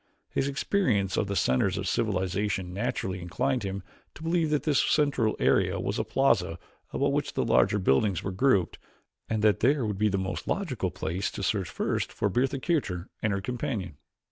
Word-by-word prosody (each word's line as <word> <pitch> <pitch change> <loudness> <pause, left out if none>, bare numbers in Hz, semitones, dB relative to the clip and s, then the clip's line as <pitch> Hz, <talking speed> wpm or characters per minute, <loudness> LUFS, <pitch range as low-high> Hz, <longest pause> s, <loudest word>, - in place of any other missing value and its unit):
His 135 - 0
experience 130 - +1
of 105 - 0
the 100 - -2
centers 95 +7 +2
of 95 0 -3
civilization 95 -2 -1
naturally 95 -3 -2
inclined 125 +9 -1
him 100 -1 -4 0.3
to 155 - -10
believe 165 -1 +1
that 150 -1 +1
this 150 -4 +3
central 140 -7 +2
area - - +2
was - - -2
a - - +1
plaza 100 -11 +2 0.3
about - - +1
which - - -1
the - - 0
larger 105 - +3
buildings 95 +1 +2
were 95 - -2
grouped 95 -3 +2 0.5
and 110 -1 -1
that 105 -3 +4
there 135 +1 +3
would 105 -2 -3
be 105 0 +3
the 100 - 0
most 95 0 -3
logical 135 - -1
place 90 +1 -3
to 100 - -6
search 95 -1 0
first - - -2
for 100 - 0
Bertha 130 +7 +1
Kircher 130 - -1
and 105 - +1
her 100 0 -1
companion. 115 - -3
105 Hz, 185 wpm, -28 LUFS, 95-130 Hz, 0.5 s, that